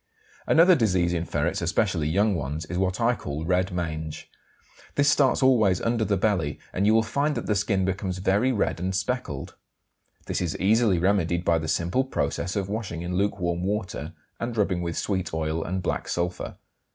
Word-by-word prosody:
Another 170 +3 +6
disease 95 - +2
in 85 -1 -1
ferrets, - - -1
especially 75 -1 0
young 100 +5 +2
ones, 75 -1 -3
is 85 +3 -3
what 95 -1 0
I 120 +1 +3
call 75 -8 -5
"red 90 +2 +1
mange." 80 -3 -4 0.6
This 145 +1 +4
starts 135 0 +3
always 110 -9 +4
under 115 -1 0
the 100 -2 +1
belly, 90 -7 0 0.2
and 100 +3 +1
you 110 - +5
will 115 - +4
find 145 +6 0
that - - -3
the 105 - +1
skin 100 -2 +1
becomes 95 -1 -2
very 100 +7 +2
red 105 -7 0
and 95 +2 -2
speckled. 95 - -3 0.7
This - - -2
is 85 -3 -2
easily 105 0 +3
remedied 85 -1 +1
by 85 -1 +3
the 80 - -4
simple 85 +11 +1
process 110 -7 -2
of 100 -2 -1
washing 100 -5 -4
in 90 +1 -4
lukewarm 90 -3 0
water 100 0 -3 0.3
and 115 -1 -4
rubbing 95 -4 +1
with 85 -1 -3
sweet 95 -5 -2
oil 80 0 -1
and 95 +1 -3
black - - -2
sulphur. 90 0 -3
95 Hz, 185 wpm, -26 LUFS, 85-110 Hz, 0.7 s, Another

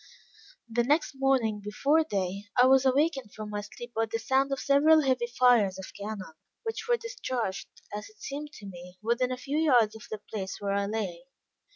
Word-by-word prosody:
The 235 +1 +1
next 295 +6 +2
morning, 260 -6 +1
before 280 +10 +2
day, 195 - -3
I 250 - +8
was 265 0 +5
awakened 270 -4 +1
from 215 -1 -6
my 205 0 -2
sleep 240 +3 -10
by 225 0 0
the 225 - 0
sound 265 +4 +1
of 275 - -1
several 305 +3 +5
heavy 255 -3 +1
fires 240 -5 +4
of 190 - -9
cannon, 200 -4 -6 0.3
which 450 0 -4
were 480 - +4
discharged, 260 - -4 0.3
as 210 +1 -5
it 215 0 -24
seemed 290 +5 -6
to 210 - -11
me, 180 -1 -10
within 240 +3 +1
a 255 - -2
few 280 +4 -2
yards 245 -9 +4
of 220 - -11
the 215 - -4
place 200 -2 -6
where 200 -1 -1
I 200 0 0
lay. 200 -3 -3
240 Hz, 195 wpm, -28 LUFS, 205-275 Hz, 0.3 s, I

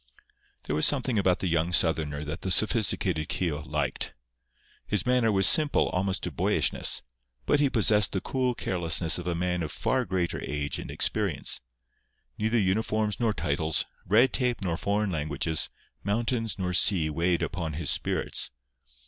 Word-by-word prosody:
There 75 - -2
was 75 - +3
something 130 -5 0
about 95 -2 +1
the 95 - 0
young 85 0 +1
Southerner 80 -4 +1
that 75 +2 -5
the 95 - -3
sophisticated 95 -6 +3
Keogh 80 -5 -2
liked. - - -3 0.7
His 105 -4 0
manner 125 -3 +3
was 95 -2 +3
simple 150 - +3
almost 95 0 -1
to 90 - -2
boyishness; 70 - 0 0.4
but 145 - +2
he 145 -1 +3
possessed 105 -3 +3
the 95 - -1
cool 125 +3 -1
carelessness 85 -3 +1
of 90 - -6
a 85 - -1
man 90 +1 -1
of 80 - -3
far 130 -1 0
greater 90 -4 -2
age 75 +1 -3
and - - -7
experience. - - -1 0.7
Neither 110 +2 0
uniforms 105 +1 0
nor 115 -2 +2
titles, 80 -4 -1 0.2
red 115 +7 +4
tape 125 -5 0
nor 85 -3 -1
foreign 100 +3 -1
languages, 80 0 -1 0.3
mountains 115 0 -1
nor 90 -2 -2
sea 85 -4 +2
weighed 85 +2 0
upon 85 -2 -3
his 80 0 -2
spirits. - - -2
95 Hz, 155 wpm, -27 LUFS, 80-110 Hz, 0.7 s, red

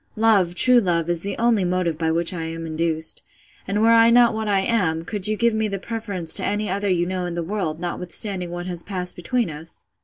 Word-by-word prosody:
Love, 205 -6 +3
true 250 +5 +6
love, 175 -5 0
is 170 -1 -2
the 200 +1 -4
only 230 -4 +2
motive 180 -2 0
by 160 +1 -1
which 170 +2 +1
I 165 -2 -4
am 165 0 -5
induced. 160 0 0 0.5
And 205 +2 0
were 230 - +5
I 230 0 +6
not 240 0 +5
what 220 0 -3
I 200 -2 +2
am, 180 -7 0
could 205 +1 -2
you 215 0 0
give 235 0 +2
me 220 0 0
the 200 -1 -3
preference 200 -6 -2
to - - -3
any 210 +1 -1
other 200 0 -1
you 175 -2 +1
know 180 0 -3
in 170 - -5
the 170 - -2
world, 170 -4 -3
notwithstanding 180 +1 -3
what 175 0 -5
has 175 -2 -2
passed 180 -2 -3
between 230 +2 -1
us? 160 +2 -7
185 Hz, 235 wpm, -22 LUFS, 170-215 Hz, 0.5 s, true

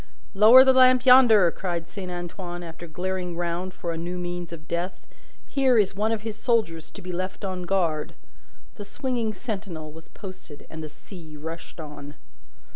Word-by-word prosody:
"Lower 220 +6 +9
the 265 0 +5
lamp 255 0 +6
yonder!" 235 -8 +7
cried 175 -3 -4
Saint 185 +1 -7
Antoine, 175 0 -6
after 170 +1 -9
glaring 180 +1 -4
round 175 +2 -2
for 175 -2 -5
a 165 - -4
new 175 +2 -4
means 175 -1 -5
of 160 -2 -10
death; 175 +2 -4 0.4
"here 265 -3 +2
is 205 -3 +3
one 215 +2 0
of 220 -2 -2
his 220 -2 -4
soldiers 210 -10 0
to - - -12
be 180 - -5
left 185 +3 -4
on 185 -2 -4
guard!" 170 -6 0 0.6
The 205 - -6
swinging 235 -1 -3
sentinel 190 -9 -6
was 160 +1 -13
posted, 185 -7 -11
and 160 - -7
the 155 - -6
sea 155 0 -12
rushed 165 +3 -8
on. 145 -2 -9
180 Hz, 175 wpm, -25 LUFS, 165-210 Hz, 0.6 s, Lower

